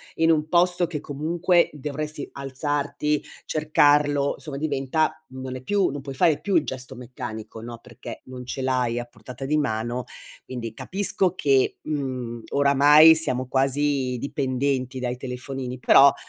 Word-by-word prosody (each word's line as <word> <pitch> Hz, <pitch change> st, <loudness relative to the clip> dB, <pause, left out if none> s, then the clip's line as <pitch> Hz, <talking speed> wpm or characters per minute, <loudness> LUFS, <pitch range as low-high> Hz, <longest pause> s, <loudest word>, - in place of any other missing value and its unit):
in 165 Hz, 0 st, +3 dB
un 155 Hz, -1 st, +1 dB
posto 175 Hz, +1 st, +2 dB
che 150 Hz, -4 st, -5 dB
comunque 170 Hz, +4 st, +1 dB
dovresti 150 Hz, +1 st, -5 dB
alzarti, 145 Hz, +2 st, -2 dB, 0.2 s
cercarlo, 145 Hz, -2 st, +2 dB
insomma 150 Hz, -4 st, -8 dB
diventa 145 Hz, +2 st, -1 dB
non 130 Hz, 0 st, -6 dB
è -, -, -10 dB
più 200 Hz, +6 st, +2 dB
non 145 Hz, -, -5 dB
puoi 135 Hz, -1 st, -8 dB
fare 155 Hz, +1 st, +3 dB
più 200 Hz, -, -1 dB
il -, -, +4 dB
gesto 130 Hz, 0 st, -6 dB
meccanico, 120 Hz, -3 st, -8 dB
no, 115 Hz, 0 st, -8 dB
perché 120 Hz, -2 st, -10 dB
non 125 Hz, -1 st, -8 dB
ce 135 Hz, -, -5 dB
l'hai 125 Hz, -2 st, 0 dB
a 120 Hz, -, -2 dB
portata 120 Hz, +2 st, -11 dB
di 150 Hz, +3 st, +1 dB
mano. 120 Hz, -3 st, -2 dB, 0.4 s
Quindi 115 Hz, -3 st, -6 dB
capisco 190 Hz, -, 0 dB
che, 135 Hz, -5 st, +2 dB
mhmm, 130 Hz, -6 st, -4 dB
oramai 145 Hz, +3 st, +7 dB
siamo 130 Hz, -5 st, -1 dB
quasi 135 Hz, -1 st, +1 dB
dipendenti 130 Hz, -2 st, -1 dB
dai 125 Hz, 0 st, -2 dB
telefonini, 125 Hz, 0 st, -5 dB
però 140 Hz, +2 st, +6 dB
135 Hz, 145 wpm, -24 LUFS, 125-150 Hz, 0.4 s, oramai